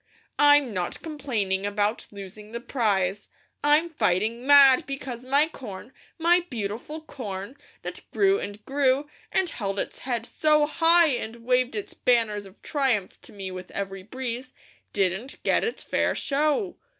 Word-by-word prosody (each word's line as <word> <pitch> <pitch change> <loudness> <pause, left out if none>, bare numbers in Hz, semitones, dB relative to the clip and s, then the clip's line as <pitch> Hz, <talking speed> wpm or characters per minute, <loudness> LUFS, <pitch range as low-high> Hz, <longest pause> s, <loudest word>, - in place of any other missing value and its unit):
"I'm 290 -4 +5
not 180 -2 -3
complaining 230 -12 -2
about 205 +2 -1
losing 205 +2 -10
the 235 - -3
prize; 205 -6 0 0.4
I'm 300 +3 +4
fighting 220 - 0
mad 280 -2 +7
because 265 -3 -5
my 280 +4 +3
corn, 245 -5 -9 0.2
my 345 +2 +4
beautiful 240 +7 -5
corn, 220 -7 -7 0.3
that - - -6
grew 395 0 +3
and 205 +1 -7
grew, 275 +1 +1 0.2
and 380 - +2
held 200 - -3
its - - -3
head 240 -3 -3
so 300 +5 +3
high, 330 +2 +5
and 235 -3 -4
waved 250 -1 +2
its 210 - -4
banners 215 -5 +1
of 190 - -19
triumph 255 -10 -1
to - - -14
me 195 -2 -6
with 185 0 -8
every 195 -1 -5
breeze, 255 +4 -6 0.4
didn't 195 +6 -1
get - - +2
its 455 - -3
fair - - 0
show. 305 +7 0
245 Hz, 150 wpm, -26 LUFS, 205-290 Hz, 0.4 s, mad